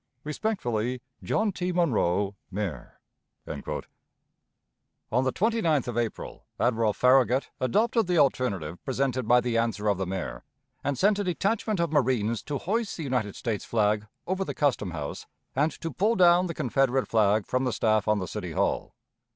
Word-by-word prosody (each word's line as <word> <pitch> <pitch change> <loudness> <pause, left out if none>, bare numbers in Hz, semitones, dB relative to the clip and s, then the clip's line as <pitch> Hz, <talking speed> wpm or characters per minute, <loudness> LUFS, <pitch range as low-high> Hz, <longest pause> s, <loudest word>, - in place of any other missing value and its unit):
"Respectfully, 130 - -2 0.2
"JOHN 215 -1 +1
T. 180 -1 -2
MONROE, 105 - +1 0.2
Mayor." 100 -4 -5 0.5
On 105 - -7
the 130 - +1
29th 180 - +1
of 120 - -3
April 120 -2 -4
Admiral 115 -3 +2
Farragut 130 +3 +3
adopted 220 - +2
the 180 -1 +1
alternative 100 - +1
presented 130 -2 -1
by 125 +1 +6
the 120 -2 0
answer 115 -2 -1
of 100 -3 +2
the 95 - -1
Mayor, 95 -1 -4 0.4
and 140 -1 -1
sent 205 - +3
a - - +1
detachment 200 +2 0
of 170 -2 0
marines 120 -6 +1
to 145 -2 -3
hoist 215 - -2
the 165 - -4
United 125 -7 -1
States 110 -4 -3
flag 105 -1 +1 0.2
over 190 +2 -1
the - - -5
Custom 135 -9 +1
House, 75 -4 -6 0.3
and 150 +4 +2
to 165 - -4
pull 215 +5 +2
down 180 -1 +5
the 165 - -5
Confederate 135 -1 +1
flag 105 -2 +3
from 130 +1 0
the 125 - +1
staff 110 -2 +1
on 105 0 +3
the 95 -2 -3
City 90 -3 -5
Hall. - - -1
125 Hz, 160 wpm, -27 LUFS, 105-170 Hz, 0.5 s, by